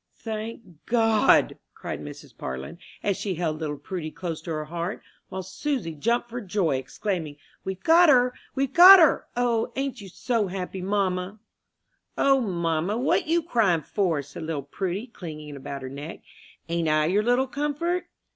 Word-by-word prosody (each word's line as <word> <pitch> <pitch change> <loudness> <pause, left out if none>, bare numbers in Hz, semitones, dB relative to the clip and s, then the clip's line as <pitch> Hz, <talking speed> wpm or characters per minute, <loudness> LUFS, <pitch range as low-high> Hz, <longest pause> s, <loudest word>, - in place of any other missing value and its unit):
"Thank 220 -6 -7
God!" 225 -2 +3 0.2
cried - - -6
Mrs. - - -10
Parlin, 65 - -6 0.2
as 200 -2 0
she 195 -3 -3
held 160 -2 -2
little 150 -2 -3
Prudy 170 0 -5
close 165 -1 -5
to - - -9
her 155 -1 -2
heart; 170 +5 -4 0.3
while 190 0 -5
Susy 190 - -3
jumped 235 +10 0
for 240 +1 -6
joy, 185 - 0
exclaiming, 155 +3 -4 0.3
"We've 190 -1 -5
got 335 +1 +6
her! 250 -2 +5 0.2
we've 275 0 -1
got 370 +3 +11
her! 325 -5 +4
O, 235 -2 +1
ain't 270 -4 -3
you 195 - -10
so 205 +3 -1
happy, 185 0 -5
mamma?" 190 0 -1 0.8
"O, 275 -1 +4
mamma, 170 -1 -1
what 275 +6 +1
you 335 +1 +2
crying 205 - +2
for?" 170 -5 0
said 145 +4 -10
little 155 -3 -3
Prudy, 190 - -3
clinging 155 - -9
about 140 0 -7
her 130 - -5
neck. 145 +4 -8 0.5
"Ain't 170 -1 -1
I 155 0 +3
your 190 +6 +2
little 245 +4 +2
comfort? 295 +6 -2
190 Hz, 165 wpm, -25 LUFS, 160-240 Hz, 0.8 s, got